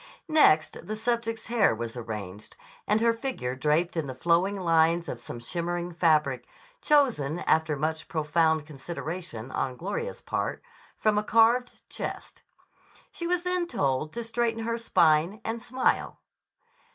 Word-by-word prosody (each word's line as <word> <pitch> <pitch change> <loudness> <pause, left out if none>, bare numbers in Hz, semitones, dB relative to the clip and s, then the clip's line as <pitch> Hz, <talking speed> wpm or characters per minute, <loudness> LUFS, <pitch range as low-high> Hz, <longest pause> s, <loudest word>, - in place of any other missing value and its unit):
Next 155 - +4
the 215 - -3
subject's 225 0 -2
hair 225 - +3
was 115 +1 -5
arranged, 105 -4 -7 0.3
and 215 +1 +2
her 230 0 +4
figure 230 - -3
draped 155 +6 +1
in 160 -4 -1
the 130 - -6
flowing 175 +6 +1
lines 165 -1 +3
of 125 - -5
some 120 - -8
shimmering 175 +6 -3
fabric, 160 -3 +2 0.3
chosen, 245 - +2
after 160 -1 +2
much 155 +2 -2
profound 160 0 +1
consideration 155 -4 -6
on 130 -2 -2
Gloria's 205 - -4
part, - - -3 0.3
from 215 -1 +2
a - - -3
carved 230 +3 +2
chest. - - -6 0.7
She 340 - -5
was 355 0 0
then 360 -1 0
told 140 - -1
to 235 - -4
straighten 230 0 -1
her 230 +1 -2
spine, 170 -2 +3
and 225 +1 -3
smile. 255 +3 0
170 Hz, 140 wpm, -27 LUFS, 150-230 Hz, 0.7 s, Next